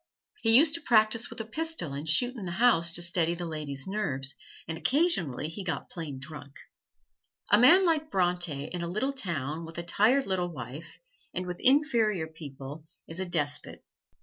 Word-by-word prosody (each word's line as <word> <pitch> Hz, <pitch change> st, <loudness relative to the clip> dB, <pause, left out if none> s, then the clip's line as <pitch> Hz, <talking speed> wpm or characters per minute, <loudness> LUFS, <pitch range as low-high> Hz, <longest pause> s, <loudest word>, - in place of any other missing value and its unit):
He 225 Hz, 0 st, +6 dB
used 300 Hz, +2 st, +5 dB
to 335 Hz, -, -1 dB
practise 220 Hz, 0 st, +3 dB
with -, -, -9 dB
a -, -, -6 dB
pistol 310 Hz, -, -3 dB
and 145 Hz, +3 st, -5 dB
shoot 245 Hz, -, +3 dB
in 210 Hz, -6 st, -6 dB
the 175 Hz, -, -4 dB
house 175 Hz, -6 st, +3 dB
to 175 Hz, -, 0 dB
steady 170 Hz, -1 st, +2 dB
the 175 Hz, 0 st, -5 dB
lady's 150 Hz, -4 st, -4 dB
nerves, 140 Hz, -10 st, -1 dB, 0.3 s
and 165 Hz, -, -4 dB
occasionally 180 Hz, -, +1 dB
he 165 Hz, +5 st, -6 dB
got 180 Hz, -3 st, -4 dB
plain 155 Hz, -6 st, -6 dB
drunk. 140 Hz, 0 st, -8 dB, 1.0 s
A 205 Hz, -, +7 dB
man 345 Hz, +11 st, +7 dB
like 315 Hz, -2 st, +1 dB
Bronte 175 Hz, -, 0 dB
in 175 Hz, 0 st, -5 dB
a 170 Hz, -, -3 dB
little 250 Hz, +10 st, -1 dB
town 165 Hz, -, -3 dB
with 165 Hz, 0 st, -9 dB
a 170 Hz, -, -3 dB
tired 220 Hz, +10 st, +3 dB
little 180 Hz, -2 st, -1 dB
wife, 150 Hz, +1 st, -9 dB, 0.4 s
and 185 Hz, -, -2 dB
with 180 Hz, 0 st, -6 dB
inferior 235 Hz, -, +3 dB
people, 150 Hz, -1 st, -10 dB, 0.2 s
is 165 Hz, +2 st, -6 dB
a 190 Hz, -, -1 dB
despot. 150 Hz, -4 st, 0 dB
175 Hz, 180 wpm, -28 LUFS, 155-230 Hz, 1.0 s, A